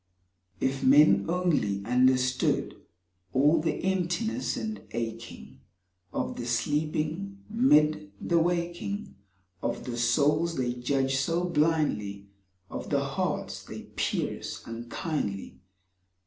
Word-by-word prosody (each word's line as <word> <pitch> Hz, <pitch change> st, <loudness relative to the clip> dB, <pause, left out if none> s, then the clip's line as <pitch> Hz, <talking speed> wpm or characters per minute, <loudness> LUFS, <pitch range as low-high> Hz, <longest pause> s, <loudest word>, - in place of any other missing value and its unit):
If 135 Hz, 0 st, -1 dB
men 145 Hz, +4 st, +6 dB
only 150 Hz, -, +1 dB
understood 130 Hz, +1 st, +2 dB, 0.6 s
All 150 Hz, +4 st, +4 dB
the 160 Hz, -1 st, -2 dB
emptiness 190 Hz, +6 st, 0 dB
and 220 Hz, 0 st, -4 dB
aching 115 Hz, 0 st, -6 dB, 0.5 s
Of -, -, -3 dB
the 120 Hz, -, -4 dB
sleeping 155 Hz, +9 st, -1 dB
mid 155 Hz, -, +3 dB
the 170 Hz, -1 st, +2 dB
waking 175 Hz, +4 st, -2 dB, 0.5 s
Of -, -, -2 dB
the 120 Hz, -2 st, -4 dB
souls 150 Hz, +8 st, +2 dB
they 125 Hz, -3 st, 0 dB
judge 135 Hz, +2 st, 0 dB
so 165 Hz, +5 st, +1 dB
blindly, 150 Hz, -, 0 dB, 0.4 s
Of -, -, -6 dB
the -, -, +2 dB
hearts -, -, -2 dB
they -, -, -8 dB
pierce -, -, -2 dB
unkindly. 115 Hz, -, -4 dB
150 Hz, 105 wpm, -28 LUFS, 120-170 Hz, 0.6 s, men